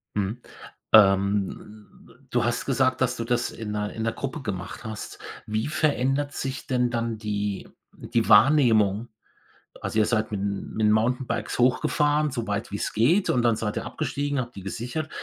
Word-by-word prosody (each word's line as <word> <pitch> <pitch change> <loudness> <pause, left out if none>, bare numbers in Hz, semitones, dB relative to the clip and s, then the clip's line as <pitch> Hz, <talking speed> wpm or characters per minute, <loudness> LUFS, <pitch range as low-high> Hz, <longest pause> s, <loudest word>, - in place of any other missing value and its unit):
Mhm, 105 +4 -2 0.5
ähm, 100 +1 +3 0.4
du 120 -1 +2
hast 120 0 -1
gesagt, 130 -1 +1
dass 125 -1 +2
du 115 - -3
das 120 0 0
in 110 -2 -6
'ner 105 0 -3
in 110 - -4
'ner 115 - +1
Gruppe 140 +5 -5
gemacht 95 -5 -5
hast. 110 -2 -7 0.3
Wie 110 +4 -2
verändert 145 -2 0
sich 135 0 -4
denn 125 -1 +1
dann 115 -1 -2
die 105 -2 -3 0.3
die 115 -1 -1
Wahrnehmung? 115 -3 +5 0.7
Also, 110 - -1
ihr 105 - +4
seid 110 -1 0
mit 105 - -2
'n 100 -1 -3
mit 110 - +1
'n - - +5
Mountainbikes 125 +4 0
hochgefahren, 145 +4 +2
so 120 -4 -4
weit 100 +1 -3
wie's 100 - -3
geht 155 - +3
und 125 - +3
dann 115 -2 +3
seid 105 -1 -3
ihr 115 - -3
abgestiegen, 145 0 -2
habt 120 -1 -5
die 100 - -7
gesichert, 120 +10 -4
115 Hz, 175 wpm, -25 LUFS, 105-130 Hz, 0.7 s, Wahrnehmung